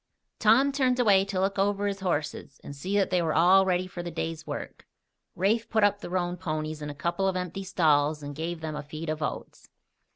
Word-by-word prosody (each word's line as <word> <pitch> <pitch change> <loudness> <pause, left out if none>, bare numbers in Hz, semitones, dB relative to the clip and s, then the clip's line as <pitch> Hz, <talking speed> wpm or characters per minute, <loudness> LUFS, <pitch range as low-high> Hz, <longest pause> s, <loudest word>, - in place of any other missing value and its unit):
Tom 235 +6 +5
turned 260 -2 +1
away 200 -5 +5
to 195 -2 -3
look 195 +1 0
over 200 +1 +1
his 200 -1 -2
horses 150 -6 -3
and 140 - -8
see 190 +8 -2
that 195 - +1
they 180 -1 +2
were 160 -2 0
all 190 +3 +5
ready 180 0 +1
for 185 -1 -7
the 175 - -5
day's 160 -1 -5
work. - - -7 0.5
Rafe 215 +6 +1
put 220 -2 +2
up 205 0 +3
the 205 - -7
roan 175 -1 -1
ponies 155 -3 -4
in 150 - -5
a 145 - -7
couple 175 +6 -1
of 190 - 0
empty 180 +1 -4
stalls 150 -4 +2
and 145 0 -6
gave 160 +2 -4
them 155 -1 -4
a 150 - -4
feed 155 +2 -7
of 155 0 -4
oats. 155 - -5
180 Hz, 225 wpm, -27 LUFS, 155-195 Hz, 0.5 s, Tom